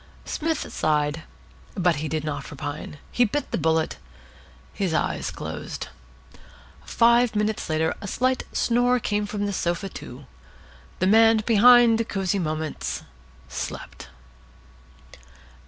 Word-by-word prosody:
Psmith 320 -1 -2
sighed. 150 0 0 0.5
But 175 -5 +2
he 155 +2 -3
did 155 0 -2
not 145 -2 -4
repine. 145 +1 -6
He 245 - +3
bit 265 +6 -2
the - - 0
bullet. 160 0 +1 0.8
His 185 -5 -1
eyes - - -1
closed. - - -6 0.9
Five 235 0 +3
minutes 210 -2 -1
later 160 +1 +1
a 200 - -6
slight 255 +5 0
snore 245 +1 +2
came 210 -2 -1
from 205 0 -3
the 200 - -2
sofa, 175 +2 -1
too. 130 -5 -10 0.7
The 185 - 0
man 225 +2 +5
behind 230 0 +6
Cosy 195 0 0
Moments 155 -2 -3 0.4
slept. - - -6
200 Hz, 120 wpm, -24 LUFS, 160-230 Hz, 0.9 s, behind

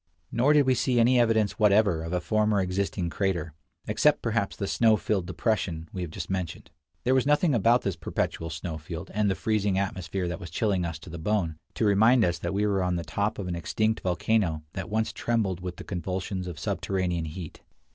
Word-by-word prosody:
Nor 130 +6 +3
did 145 -2 +5
we 130 - +4
see 125 0 +1
any 120 +2 +5
evidence 110 -3 +2
whatever 100 -5 +4
of 80 - -5
a 90 - +1
former 105 +2 +1
existing 90 -1 -1
crater, 85 -5 -1 0.3
except 140 +8 +2
perhaps 115 -3 0
the 100 - -3
snow 110 +2 +3
filled 95 -5 -1
depression 90 -5 -1
we 95 - -4
have 90 - -4
just - - -6
mentioned. 95 -3 -4 0.3
There 130 - +3
was 130 +1 +2
nothing 150 +1 +3
about 120 +2 +3
this 100 - -1
perpetual 80 - -3
snow 80 +1 -5
field, 85 +4 -7
and 105 0 +2
the 95 - +1
freezing 105 -3 0
atmosphere 95 -1 -2
that 85 +2 -4
was 85 -4 -8
chilling 95 0 0
us 80 -2 -4
to 80 +2 -12
the 85 - -6
bone, 85 -4 -1 0.2
to 115 - +1
remind 110 +4 +5
us 85 -1 -1
that 85 - -3
we 100 +2 +1
were 100 -2 +1
on 90 -1 0
the 85 - -2
top 100 +7 -1
of 100 - -4
an 90 - -2
extinct 110 +6 0
volcano 90 -3 0
that 95 -2 -5
once 110 +1 0
trembled 105 -6 -1
with 90 -1 -5
the - - -9
convulsions 95 +1 -3
of 85 -3 -6
subterranean 90 -2 -1
heat. 80 +1 -8
95 Hz, 210 wpm, -27 LUFS, 85-110 Hz, 0.3 s, did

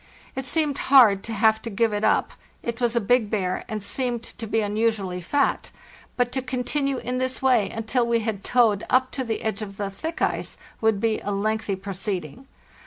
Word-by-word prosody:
It 265 0 -4
seemed 300 -2 0
hard 230 -8 +7
to 230 - -5
have 220 0 +3
to 230 - -5
give 225 +1 +1
it 205 +1 -2
up; - - +2 0.3
it 235 +1 -4
was 240 -1 +1
a - - +4
big 230 0 +2
bear 185 -4 -1
and 215 -2 -3
seemed 245 0 -1
to 230 -1 -8
be 225 +1 +1
unusually 205 -3 -1
fat; 280 +11 0 0.5
but 245 -1 +1
to 265 - -1
continue 265 +2 -1
in 250 +1 -3
this 255 0 -1
way 250 -6 +3
until 225 +2 -1
we 235 -1 +2
had 215 -3 -3
towed 225 -5 +3
up 255 0 +3
to 265 - -3
the 225 -3 -3
edge 220 -1 -2
of 200 -2 -7
the 200 -1 -3
thick 320 +11 -5
ice - - -1 0.2
would 220 -2 +2
be 220 0 +1
a - - -5
lengthy 215 0 -1
proceeding. 195 - -5
225 Hz, 200 wpm, -24 LUFS, 205-250 Hz, 0.5 s, hard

